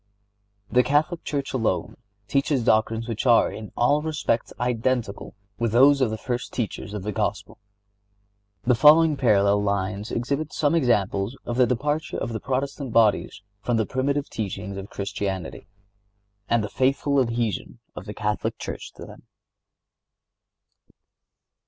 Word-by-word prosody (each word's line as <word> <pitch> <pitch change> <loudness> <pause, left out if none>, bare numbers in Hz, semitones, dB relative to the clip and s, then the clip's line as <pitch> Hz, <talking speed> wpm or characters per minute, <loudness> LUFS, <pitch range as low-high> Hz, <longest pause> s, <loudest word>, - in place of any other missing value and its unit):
The 125 - +5
Catholic 155 +6 +1
Church 140 -2 -3
alone 110 -4 -1 0.3
teaches 140 -1 +1
doctrines 110 +1 +1
which 115 +2 -3
are 120 -2 +5
in 110 -1 -8
all 145 +5 +3
respects 150 -7 -1
identical 120 -3 -1 0.2
with 115 -2 0
those 135 +3 +6
of 130 - +3
the 110 - -3
first 120 +2 -4
teachers 105 -3 -4
of 100 - -5
the 105 - -2
Gospel. 100 - -3 1.0
The 125 - +3
following 150 +5 +6
parallel 105 -6 +3
lines 100 +1 -2
exhibit 140 +6 -2
some 145 0 +1
examples 110 - +1
of 120 - -3
the 125 -1 +5
departure 145 +5 -1
of 120 - -3
the 110 - -3
Protestant 135 +1 -3
bodies 105 -3 +2 0.2
from 120 0 0
the 110 - +1
primitive 140 +3 -1
teachings 100 -1 -5
of 100 +1 -7
Christianity, 100 -3 -4 0.8
and 115 -2 +2
the - - -2
faithful 135 +2 +1
adhesion 115 -4 -2 0.2
of 95 - -8
the 105 - -7
Catholic 105 0 -2
Church - - -7
to - - -10
them. - - -14
120 Hz, 140 wpm, -24 LUFS, 105-135 Hz, 1.0 s, those